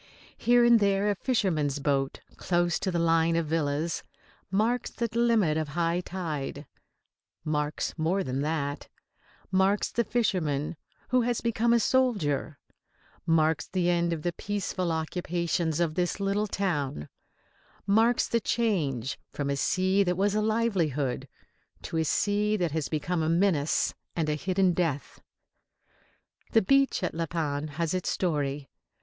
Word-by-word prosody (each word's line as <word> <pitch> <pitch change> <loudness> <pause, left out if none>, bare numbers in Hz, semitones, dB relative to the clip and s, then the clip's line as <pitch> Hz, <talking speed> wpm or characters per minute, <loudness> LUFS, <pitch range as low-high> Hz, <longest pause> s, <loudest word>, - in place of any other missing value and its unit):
Here 240 +1 +4
and 235 -1 +6
there 200 0 +2
a - - -1
fisherman's 175 - 0
boat 140 -1 -1
close 175 -1 0
to 190 - -1
the 175 - -1
line 165 0 +3
of 165 -1 +1
villas 155 +1 -1 0.5
marks 220 +6 +1
the 235 - -2
limit 225 -9 +3
of 155 -1 -1
high 170 0 +1
tide; 155 -6 -5 0.8
marks 150 -1 -1
more 180 +5 +1
than 130 +1 -2
that; 145 -2 -2 0.6
marks 190 +2 +2
the 235 - +1
fisherman 175 - 0 0.3
who 255 0 +3
has 240 0 0
become 235 0 +1
a 235 - +5
soldier; 200 - +1 0.7
marks 160 -1 +2
the 180 -2 +1
end 170 0 +1
of 160 -2 -3
the 175 - -1
peaceful 185 -2 -2
occupations 170 0 -1
of 170 -3 +1
the 175 +1 0
little 200 +2 0
town; 145 - -2 0.8
marks 225 +4 +3
the 235 - +1
change 155 - -1
from 140 -1 -2
a - - 0
sea 185 +7 +2
that 180 -2 +1
was 200 +1 +2
a 215 - +1
livelihood 185 - 0 0.6
to 165 - -4
a 160 - +2
sea 205 +7 +1
that 175 -5 0
has 155 -2 -2
become 165 +3 -1
a 160 - 0
menace 165 -4 +2 0.2
and 160 -3 0
a - - +2
hidden 185 +3 +1
death. 160 -5 -2 1.3
The 225 - +5
beach 275 +2 +3
at 180 - -1
La 165 +1 -2
Panne 150 -2 -2
has 160 +3 -2
its 185 -1 -1
story. 145 -5 -1
175 Hz, 145 wpm, -28 LUFS, 155-200 Hz, 1.3 s, and